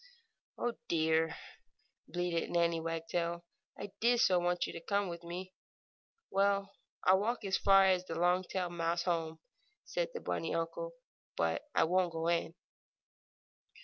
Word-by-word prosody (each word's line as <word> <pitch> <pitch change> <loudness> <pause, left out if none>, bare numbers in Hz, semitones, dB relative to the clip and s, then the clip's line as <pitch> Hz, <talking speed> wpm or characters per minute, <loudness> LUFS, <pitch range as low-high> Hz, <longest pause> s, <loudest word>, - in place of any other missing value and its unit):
"Oh, 240 - -1
dear!" 160 0 +2 0.7
bleated 175 -1 -1
Nannie 170 -1 +2
Wagtail. 170 +1 -2 0.3
"I 200 0 -6
did 240 +1 +4
so 185 -5 +5
want 175 0 +1
you - - -6
to 165 - -7
come 200 +2 0
with 170 0 -7
me!" 180 +2 -6 0.8
"Well, 200 0 +2 0.3
I'll 190 +1 +5
walk 225 +2 -1
as 190 -1 +1
far 195 -1 +6
as 185 -1 +3
the 165 - -5
Longtail 180 0 +1
mouse 170 0 -1
home,"' 165 -2 -1 0.4
said - - -2
the - - -2
bunny 165 - -2
uncle, 165 - -3 0.4
"but - - +1
I - - +5
won't 175 +1 +2
go 165 +1 -1
in. 170 -1 0
175 Hz, 145 wpm, -33 LUFS, 165-195 Hz, 0.8 s, far